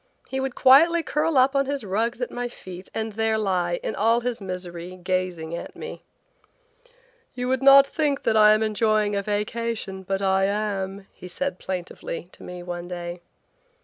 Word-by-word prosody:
He 265 - -2
would 265 -1 -3
quietly 330 +6 +6
curl 305 0 0
up 260 +2 +4
on 275 -1 +2
his 280 -2 -2
rugs 225 +5 -1
at - - -4
my 245 0 -3
feet 185 -5 -10
and 220 -1 -3
there 220 +1 +1
lie, 180 -4 0
in - - -2
all 230 +3 +2
his 240 -2 -3
misery, 180 -1 -6
gazing 180 -3 -2
at - - -8
me. - - -8 1.3
"You 250 0 -3
would 260 0 +1
not 275 0 +8
think 285 -1 -1
that - - +2
I 215 -1 +7
am 215 +1 +2
enjoying 215 -1 +1
a 200 - 0
vacation, 210 -1 -3
but 195 +1 -2
I 190 0 +3
am," 200 -1 -2
he 180 - -11
said 275 +10 -3
plaintively 175 -2 -5
to - - -16
me 180 0 -8
one 175 0 -6
day. 175 0 -6
210 Hz, 180 wpm, -24 LUFS, 185-245 Hz, 1.3 s, not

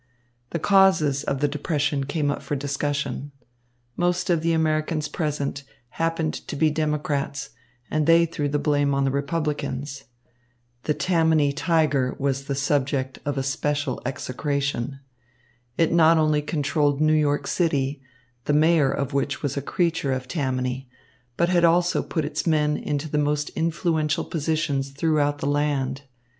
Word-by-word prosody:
The - - -2
causes 170 -6 +4
of 135 0 -2
the 145 - +3
depression 145 -1 -1
came 145 +1 0
up - - -4
for 145 - -3
discussion. 140 0 -2 0.6
Most 175 0 0
of 170 -2 +2
the 165 +1 +1
Americans 155 -1 0
present 145 -3 -2 0.3
happened 165 +2 -1
to - - -4
be 155 +2 +3
Democrats, 145 -3 -2 0.4
and 155 0 +1
they 165 0 +6
threw 150 -3 -2
the 145 - 0
blame 145 -1 +1
on 140 0 +1
the 135 - +1
Republicans. 140 -2 -3 0.8
The 150 - +1
Tammany 160 -5 +2
Tiger 150 -4 +1
was 135 -1 -1
the 140 - -2
subject 135 -1 0
of 145 -1 -2
especial 140 0 -1
execration. 135 0 -2 0.8
It 165 -1 +2
not 165 -1 +6
only 155 -1 +2
controlled 145 -1 0
New 155 0 +3
York 145 -2 +2
City, 145 -5 0 0.4
the 150 - +1
mayor 155 -1 +4
of 140 +1 -2
which 140 +2 -1
was 140 -1 -1
a 140 - -1
creature 165 -3 0
of 130 -1 -4
Tammany, 130 -3 -2 0.5
but 170 +1 +2
had 175 -2 +3
also 175 +1 +3
put 160 -4 -2
its 150 +2 -3
men 150 -2 +2
into 150 +1 -3
the 150 0 0
most 150 0 0
influential 160 -1 0
positions 150 -3 -1
throughout 145 0 +1
the 140 - -5
land. 140 -2 0
145 Hz, 150 wpm, -24 LUFS, 140-160 Hz, 0.8 s, they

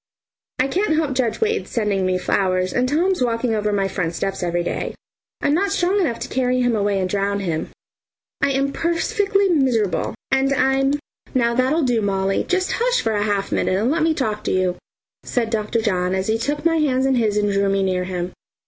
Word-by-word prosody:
I 260 - +2
can't 355 +3 +1
help 310 -3 0
judge 245 -4 -1
Wade's 445 0 0
sending 205 -5 0
me 185 0 +1
flowers 185 0 0
and 250 +1 +1
Tom's 350 +3 +1
walking 230 0 0
over 210 -1 0
my 200 -1 +1
front 175 -3 -3
steps 195 +3 -3
every 175 -1 0
day. - - -3 0.5
I'm 285 - +2
not 390 +5 +1
strong 390 +1 +1
enough 240 -10 0
to - - -3
carry 255 0 0
him 245 -2 +2
away 200 -1 +1
and 185 - 0
drown 200 +1 -1
him. 165 -4 -2 0.7
I 280 - +3
am 275 +1 0
perfectly 395 +4 +1
miserable 250 - +1 0.2
and 270 +1 +2
I'm 270 +1 +2 0.2
" - - -27
"Now 235 -2 +2
that'll 260 +6 +2
do, 245 -4 +1
Molly, 195 -1 0
just 370 +1 0
hush - - +2
for 225 - 0
a 205 - 0
half 200 -2 -1
minute, 185 - +1
and 225 +6 +1
let 325 +1 0
me 320 0 +2
talk 215 -7 -2
to - - 0
you," 185 -1 +1 0.4
said 230 -3 -2
Dr. 220 +1 0
John 185 -3 0
as 190 0 -1
he 220 +2 0
took 295 +5 -2
my 330 -1 +3
hand 265 -4 +1
in 270 - +2
his 220 -4 +1
and 205 -1 +1
drew 200 0 +2
me 195 0 +1
near 185 -1 0
him. 180 -1 -3
235 Hz, 210 wpm, -21 LUFS, 195-285 Hz, 0.7 s, I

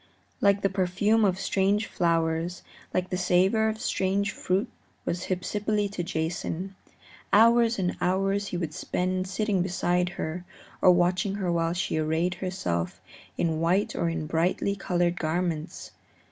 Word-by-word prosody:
Like 200 0 +3
the 195 - +3
perfume 195 +4 +2
of 190 -2 +2
strange 200 +3 +1
flowers, 165 0 0 0.3
like 185 0 -1
the 180 - -1
savor 190 +5 +3
of 220 0 -4
strange 200 -2 0
fruit 195 +5 -1 0.4
was 180 +2 -2
Hypsipyle 205 +3 -1
to 190 - -3
Jason. 170 +3 -3 0.6
Hours 230 +2 +5
and 180 -2 -1
hours 195 +2 +1
he 180 - -3
would 165 -3 -3
spend 185 +4 -2
sitting 205 -1 0
beside 180 -1 0
her 165 +3 -3 0.4
or - - +6
watching 180 +2 +3
her 190 -4 -1
while 165 0 +1
she 175 -3 -1
arrayed 160 +3 0
herself 90 - -3 0.4
in 160 -2 0
white 180 +5 +1
or 170 - 0
in 165 -2 -3
brightly 170 +5 0
colored 175 -2 0
garments. 165 0 -2
180 Hz, 145 wpm, -27 LUFS, 170-200 Hz, 0.6 s, or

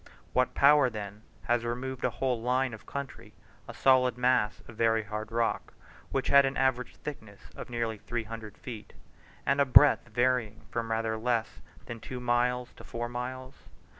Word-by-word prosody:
What 125 0 +1
power, 145 -1 +6
then, 105 -2 -7 0.2
has 120 0 +1
removed 125 +2 -4
along 125 - +2
a 120 - -18
whole 125 -3 0
line 125 +1 +1
of 110 - -11
country, 140 -3 -7 0.3
a - - -7
solid 125 -2 +4
mass 125 -4 +1
of 120 - -12
very 115 0 +2
hard 110 +2 -6
rock, 115 0 -1 0.3
which - - -1
had 140 0 +7
an 135 +1 -1
average 130 -2 0
thickness 110 -8 -9
of - - -8
nearly 115 -3 -2
three 120 +2 -3
hundred 110 -1 -9
feet, 115 -5 -9 0.5
and 140 +1 +2
a - - +5
breadth 140 0 +6
varying 120 -2 0
from 115 -1 -3
rather 110 0 -1
less 115 -1 -1 0.2
than 120 -1 -7
two 125 +3 -7
miles 125 0 0
to - - -11
four 120 0 -5
miles? 130 +2 -7
120 Hz, 175 wpm, -29 LUFS, 115-130 Hz, 0.5 s, had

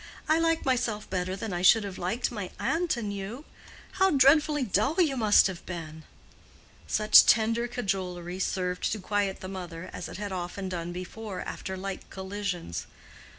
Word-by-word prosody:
I 315 +1 +4
like 330 0 +1
myself 240 -5 0
better 185 0 -1
than 200 0 -5
I 175 - -2
should 215 +4 +6
have 195 -2 -6
liked 225 +9 -1
my 205 -6 -5
aunt 335 -4 0
and 210 -3 -3
you. 205 +9 -6 0.5
How 385 0 +3
dreadfully 295 0 +4
dull 220 - +1
you 310 -7 +3
must 215 -4 +5
have 185 -3 -3
been!" 160 -3 -7 0.8
Such 215 0 +6
tender 230 +2 +3
cajolery 185 -6 -3
served 180 -1 -1
to 215 - -4
quiet 200 0 -1
the 185 - -6
mother, 180 -2 -7
as 175 - -6
it - - -8
had 205 0 -4
often 185 +1 -4
done 175 -1 -4
before 185 +3 -6
after 190 -1 -5
like 195 0 -6
collisions. 190 - -4
200 Hz, 165 wpm, -28 LUFS, 185-235 Hz, 0.8 s, should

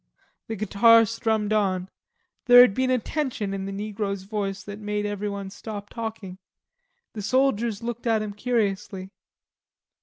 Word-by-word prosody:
The 225 - -4
guitar 225 +3 +5
strummed 220 -1 -1
on. 190 -3 0 0.6
There 245 -1 +9
had 245 -5 +6
been 260 +4 0
a 255 - +3
tension 245 -6 -3
in 195 0 -4
the - - -4
negro's 200 -1 -4
voice 200 -1 -4
that 205 0 -8
had - - -14
made 210 0 -2
everyone 200 -1 -4
stop 205 -1 -8
talking. 220 -5 -6 0.7
The 215 - -5
soldiers 235 -2 +1
looked 240 0 -4
at 220 -2 +2
him 210 -1 -5
curiously. 200 -4 -2
210 Hz, 150 wpm, -25 LUFS, 200-230 Hz, 0.7 s, There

